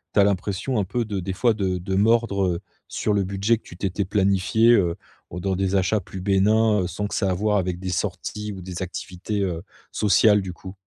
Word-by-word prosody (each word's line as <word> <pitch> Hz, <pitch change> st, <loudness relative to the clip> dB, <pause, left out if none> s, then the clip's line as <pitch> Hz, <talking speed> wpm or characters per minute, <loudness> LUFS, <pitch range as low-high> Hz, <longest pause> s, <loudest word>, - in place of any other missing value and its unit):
tu -, -, +4 dB
as -, -, +7 dB
l'impression 100 Hz, +5 st, 0 dB
un -, -, +1 dB
peu 120 Hz, +4 st, -2 dB
de 100 Hz, -3 st, -3 dB
des 95 Hz, +1 st, -3 dB
fois 115 Hz, +4 st, +2 dB
de 95 Hz, -3 st, -1 dB
de 95 Hz, +2 st, -3 dB
mordre, 105 Hz, -2 st, +2 dB
heu, 85 Hz, -1 st, -1 dB, 0.3 s
sur 105 Hz, -, -1 dB
le 100 Hz, -1 st, +2 dB
budget 100 Hz, +4 st, +1 dB
que -, -, -21 dB
tu 85 Hz, -, -13 dB
t'étais 100 Hz, +1 st, -1 dB
planifié, 100 Hz, +3 st, +3 dB
heu, 90 Hz, -6 st, +2 dB, 0.4 s
dans 95 Hz, +2 st, -2 dB
des 95 Hz, +1 st, 0 dB
achats 100 Hz, +3 st, +2 dB
plus 95 Hz, +2 st, -9 dB
bénins? 105 Hz, 0 st, +3 dB
Sans 100 Hz, +4 st, -4 dB
que -, -, -8 dB
ça 100 Hz, -, +1 dB
ait -, -, +1 dB
à -, -, +1 dB
voir 105 Hz, +2 st, +1 dB
avec 90 Hz, -2 st, -1 dB
des 95 Hz, 0 st, -4 dB
sorties 105 Hz, +3 st, -3 dB
ou 95 Hz, -, -8 dB
des 90 Hz, 0 st, -6 dB
activités, 95 Hz, +3 st, -4 dB
heu, 85 Hz, -4 st, -2 dB, 0.3 s
sociales, 105 Hz, 0 st, +4 dB
du 95 Hz, -1 st, -5 dB
coup. 95 Hz, +3 st, -10 dB
100 Hz, 225 wpm, -23 LUFS, 90-105 Hz, 0.4 s, as